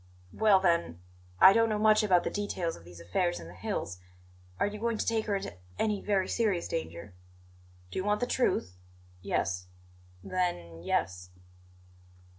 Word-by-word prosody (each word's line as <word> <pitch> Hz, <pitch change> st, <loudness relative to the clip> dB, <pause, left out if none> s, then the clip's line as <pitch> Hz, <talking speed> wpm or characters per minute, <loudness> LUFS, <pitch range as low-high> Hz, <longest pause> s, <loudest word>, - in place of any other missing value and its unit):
"Well, 210 Hz, -3 st, +5 dB
then 170 Hz, -, +1 dB, 0.4 s
I 190 Hz, -, +9 dB
don't 230 Hz, +1 st, +3 dB
know 215 Hz, -, 0 dB
much 215 Hz, 0 st, +5 dB
about 185 Hz, -5 st, +3 dB
the -, -, -2 dB
details 190 Hz, -5 st, -2 dB
of -, -, -14 dB
these 85 Hz, 0 st, -13 dB
affairs 175 Hz, -, -1 dB
in 80 Hz, -, -9 dB
the 85 Hz, -, -11 dB
hills, 90 Hz, 0 st, -4 dB, 0.6 s
are -, -, +3 dB
you 205 Hz, +1 st, -4 dB
going 230 Hz, 0 st, 0 dB
to -, -, -1 dB
take 225 Hz, -1 st, 0 dB
her 205 Hz, -, +1 dB
into 195 Hz, -, -4 dB, 0.2 s
any 210 Hz, -2 st, 0 dB
very 195 Hz, -3 st, +1 dB
serious 205 Hz, -7 st, 0 dB
danger?" 95 Hz, -, -5 dB, 0.8 s
"Do -, -, -3 dB
you -, -, -1 dB
want 210 Hz, +1 st, +1 dB
the 245 Hz, -, +1 dB
truth?" 90 Hz, -, 0 dB, 0.4 s
"Yes." 90 Hz, 0 st, -1 dB, 0.6 s
"Then 85 Hz, -, -2 dB
yes." 90 Hz, +1 st, -1 dB
185 Hz, 165 wpm, -30 LUFS, -, 0.8 s, I